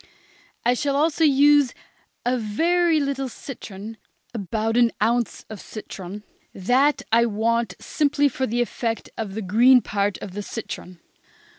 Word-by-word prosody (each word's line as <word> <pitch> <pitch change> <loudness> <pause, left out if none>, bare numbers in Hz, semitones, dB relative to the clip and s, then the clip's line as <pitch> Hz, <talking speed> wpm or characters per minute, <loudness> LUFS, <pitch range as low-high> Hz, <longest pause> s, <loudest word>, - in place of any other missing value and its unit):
I 245 - +4
shall 280 +2 -1
also 315 +2 +2
use 290 -2 +5 0.5
a 245 +1 +2
very 325 +9 +2
little 275 -2 -2
citron, 220 -4 -9 0.4
about 220 +1 -2
an 240 -1 +4
ounce 235 +2 0
of 215 -3 -9
citron. 205 -2 -8 0.3
That 255 +9 +2
I 235 +1 +4
want 225 -2 0
simply 290 -1 +1
for 260 0 -2
the 240 +2 0
effect 230 -1 -4
of 205 -3 -5
the 220 - -3
green 240 +7 +6
part 200 -1 -1
of 185 - -8
the 205 - -4
citron. 185 -4 -7
235 Hz, 140 wpm, -23 LUFS, 210-275 Hz, 0.5 s, green